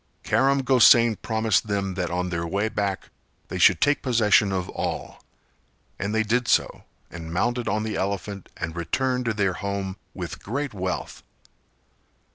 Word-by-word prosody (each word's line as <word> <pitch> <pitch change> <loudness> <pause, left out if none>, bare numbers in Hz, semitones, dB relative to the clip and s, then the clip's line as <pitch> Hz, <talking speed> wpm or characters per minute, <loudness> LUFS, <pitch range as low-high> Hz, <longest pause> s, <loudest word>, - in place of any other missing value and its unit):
Karam 135 0 +2
Gosain 120 -3 +6
promised 110 -3 +1
them 100 -2 -1
that 90 -1 -2
on 90 +1 -2
their 85 0 -2
way 100 +5 -1
back 100 -3 -3 0.4
they - - -4
should - - +6
take 145 0 +2
possession 110 -5 +3
of 95 -2 -2
all; - - -5 0.8
and 100 +2 -2
they 110 +1 +1
did 115 +3 0
so - - +1 0.3
and 80 -1 -8
mounted 120 +7 -1
on 105 +1 0
the 110 -1 -3
elephant 100 0 -4
and 80 0 -5
returned 125 +9 -1
to 115 - 0
their 95 -3 +1
home 100 0 -4 0.2
with 85 -4 -6
great 135 +4 -3
wealth. 95 -2 -4
100 Hz, 155 wpm, -24 LUFS, 95-115 Hz, 0.8 s, Gosain